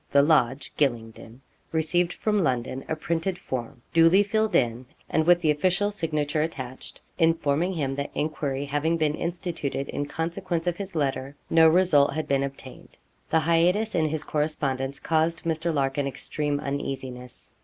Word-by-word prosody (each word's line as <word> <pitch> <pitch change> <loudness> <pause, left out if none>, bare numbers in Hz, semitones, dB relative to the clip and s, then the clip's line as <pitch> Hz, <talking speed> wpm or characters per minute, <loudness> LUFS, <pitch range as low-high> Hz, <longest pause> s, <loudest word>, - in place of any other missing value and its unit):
The 140 0 +5
Lodge, 140 -3 +2
Gylingden,' 115 -2 -2 0.3
received 170 +2 +1
from 210 -1 0
London 130 -1 -1
a 160 - 0
printed 170 +3 -2
form, 125 -3 -6
duly 165 +4 +6
filled 215 +1 0
in, 120 +1 +1 0.2
and 160 0 +1
with 175 0 +6
the 155 - +3
official 185 +7 +1
signature 155 -6 -1
attached, 130 -5 -6 0.2
informing 165 +1 +2
him 140 -4 -1
that 140 - -3
enquiry 145 -2 -2
having 145 +4 0
been 155 -2 +1
instituted 170 -5 -3
in 145 - -3
consequence 170 +2 -3
of 175 -1 -1
his 195 -3 -7
letter, 135 -2 -1 0.2
no 165 0 +7
result 160 -5 +4
had 155 -1 -2
been 140 -1 +2
obtained. 135 -1 -8 0.3
The 160 - +3
hiatus 175 +7 +2
in 155 -3 +1
his 155 0 -3
correspondence 140 -3 -2
caused 165 +1 0
Mr. 165 +1 -1
Larkin 140 -1 0
extreme 145 +1 -2
uneasiness. 130 -3 -5
155 Hz, 155 wpm, -26 LUFS, 140-170 Hz, 0.3 s, no